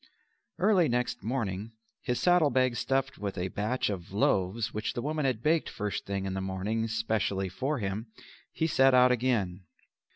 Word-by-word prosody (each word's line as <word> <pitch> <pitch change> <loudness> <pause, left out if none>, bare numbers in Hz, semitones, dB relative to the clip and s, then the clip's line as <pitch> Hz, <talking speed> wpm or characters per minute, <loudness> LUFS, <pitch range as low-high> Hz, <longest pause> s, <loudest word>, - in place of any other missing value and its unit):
Early 185 -7 +3
next 125 +1 -1
morning, 110 -3 -3 0.3
his 125 -2 -1
saddle 175 -4 +4
bag 130 -1 +2
stuffed 135 +2 -1
with 100 -1 -4
a 90 +1 -2
batch 110 +7 -1
of 95 -4 -5
loaves 100 +2 +1
which 105 +1 -2
the 120 - -3
woman 150 0 -1
had 125 -4 -1
baked 160 +1 +2
first 105 0 -4
thing 100 -1 -2
in 95 - -3
the 95 - -2
morning 100 +4 -2
specially 110 -3 -1
for 135 +11 -2
him, 105 +1 -3 0.4
he 160 - -1
set 135 -4 +4
out 125 0 +6
again. 110 -7 0
115 Hz, 170 wpm, -29 LUFS, 100-130 Hz, 0.4 s, out